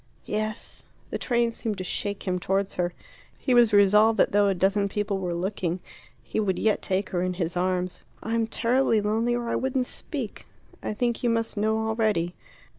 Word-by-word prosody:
"Yes." 215 Hz, 0 st, -4 dB, 0.3 s
The -, -, -2 dB
train 235 Hz, -2 st, +1 dB
seemed 220 Hz, -3 st, -3 dB
to 185 Hz, -, -4 dB
shake 200 Hz, +2 st, -3 dB
him 180 Hz, 0 st, 0 dB
towards 195 Hz, +2 st, 0 dB
her. 175 Hz, -1 st, -1 dB, 0.5 s
He 255 Hz, -, 0 dB
was 240 Hz, -2 st, +6 dB
resolved 210 Hz, +2 st, +5 dB
that -, -, +4 dB
though 205 Hz, 0 st, +4 dB
a 195 Hz, -, +2 dB
dozen 200 Hz, +2 st, +2 dB
people 205 Hz, -1 st, -1 dB
were 180 Hz, -2 st, -2 dB
looking, 180 Hz, -1 st, -2 dB, 0.4 s
he -, -, -3 dB
would 195 Hz, -3 st, +1 dB
yet 215 Hz, -1 st, +1 dB
take 190 Hz, 0 st, -1 dB
her 175 Hz, -, 0 dB
in 180 Hz, 0 st, -1 dB
his 175 Hz, -1 st, -2 dB
arms. 180 Hz, 0 st, -1 dB, 0.2 s
"I'm 225 Hz, 0 st, 0 dB
terribly 235 Hz, 0 st, +2 dB
lonely, 220 Hz, +3 st, +1 dB
or 240 Hz, -1 st, -3 dB
I -, -, 0 dB
wouldn't 260 Hz, -1 st, 0 dB
speak. -, -, -5 dB, 0.3 s
I 215 Hz, -, -3 dB
think 240 Hz, +1 st, 0 dB
you 240 Hz, -, +2 dB
must 230 Hz, 0 st, 0 dB
know 220 Hz, +1 st, +1 dB
already." 215 Hz, -6 st, +1 dB
210 Hz, 190 wpm, -26 LUFS, 185-225 Hz, 0.5 s, was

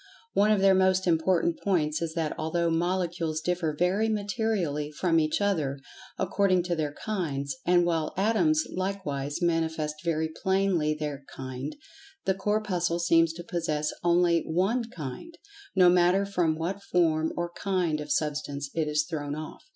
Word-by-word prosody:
One 205 Hz, +1 st, +4 dB
of 210 Hz, -2 st, +3 dB
their 195 Hz, 0 st, +6 dB
most 190 Hz, 0 st, +3 dB
important 170 Hz, 0 st, +2 dB
points 160 Hz, -6 st, 0 dB
is 165 Hz, -1 st, -3 dB
that 160 Hz, -2 st, -1 dB
although 165 Hz, +2 st, 0 dB
Molecules 170 Hz, -1 st, -1 dB
differ 165 Hz, -2 st, -1 dB
very 190 Hz, +6 st, +2 dB
materially 200 Hz, -8 st, -1 dB
from 165 Hz, +2 st, +2 dB
each 155 Hz, -1 st, +1 dB
other, 160 Hz, -10 st, 0 dB, 0.4 s
according 185 Hz, -3 st, +2 dB
to 175 Hz, -1 st, -1 dB
their 150 Hz, -3 st, -2 dB
kinds; 140 Hz, -10 st, -2 dB
and 175 Hz, -1 st, +5 dB
while 165 Hz, -3 st, 0 dB
Atoms 310 Hz, -, +3 dB
likewise 175 Hz, -5 st, -3 dB
manifest 160 Hz, -2 st, 0 dB
very 160 Hz, -2 st, 0 dB
plainly 190 Hz, -5 st, +1 dB
their 150 Hz, -2 st, -5 dB
"kind," 130 Hz, +2 st, -6 dB, 0.5 s
the 190 Hz, -, +3 dB
Corpuscle 190 Hz, -3 st, 0 dB
seems 165 Hz, -1 st, +3 dB
to 175 Hz, +1 st, -8 dB
possess 155 Hz, -3 st, -2 dB
only 170 Hz, -1 st, +3 dB
one 195 Hz, +9 st, 0 dB
"kind," 165 Hz, -, -8 dB, 0.4 s
no 185 Hz, -2 st, +6 dB
matter 180 Hz, +2 st, +4 dB
from 175 Hz, -5 st, +1 dB
what 180 Hz, +5 st, -3 dB
form 160 Hz, -4 st, +1 dB
or 175 Hz, 0 st, -2 dB
"kind" 175 Hz, -5 st, -1 dB
of 150 Hz, 0 st, -6 dB
Substance 145 Hz, -2 st, -2 dB
it 160 Hz, -2 st, 0 dB
is 150 Hz, 0 st, +1 dB
thrown 145 Hz, -4 st, -3 dB
off. 155 Hz, 0 st, -8 dB
170 Hz, 150 wpm, -27 LUFS, 155-190 Hz, 0.5 s, their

